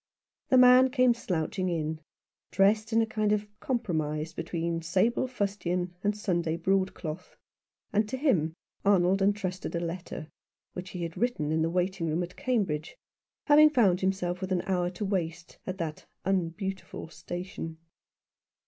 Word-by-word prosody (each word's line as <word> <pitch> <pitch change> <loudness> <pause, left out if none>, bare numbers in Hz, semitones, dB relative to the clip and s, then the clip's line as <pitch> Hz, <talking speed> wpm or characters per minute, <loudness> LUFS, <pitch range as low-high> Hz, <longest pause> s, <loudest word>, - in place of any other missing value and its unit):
The 260 - +5
man 255 +1 +8
came 255 -2 +4
slouching 185 -3 -2
in, 160 -2 -2 0.5
dressed 215 +3 +3
in 225 0 +4
a - - +1
kind 215 -1 0
of 210 0 +1
compromise 160 - -2
between 165 0 -2
stable 195 +10 +1
fustian 190 -6 -2
and 205 0 +1
Sunday 170 -6 0
broadcloth; 185 -2 -1 0.6
and 210 +1 +2
to 260 - -3
him 180 - +1 0.3
Arnold 195 -1 +4
entrusted 195 -3 -1
a - - +1
letter 170 -2 -5 0.5
which 185 +1 -6
he 180 -2 -5
had 165 -1 -5
written 225 -11 0
in 160 0 +1
the 165 - +2
waiting 180 0 0
room 160 +3 0
at 175 - -8
Cambridge, 205 - -1 0.5
having 300 +1 +7
found 205 -11 +3
himself 185 -1 -1
with 190 0 -4
an 180 -2 +1
hour 180 -2 0
to 180 +3 -4
waste 170 -3 -3
at 185 0 -3
that 160 -4 -5 0.2
unbeautiful 190 0 -2
station. 175 -1 -6
185 Hz, 150 wpm, -29 LUFS, 170-210 Hz, 0.6 s, man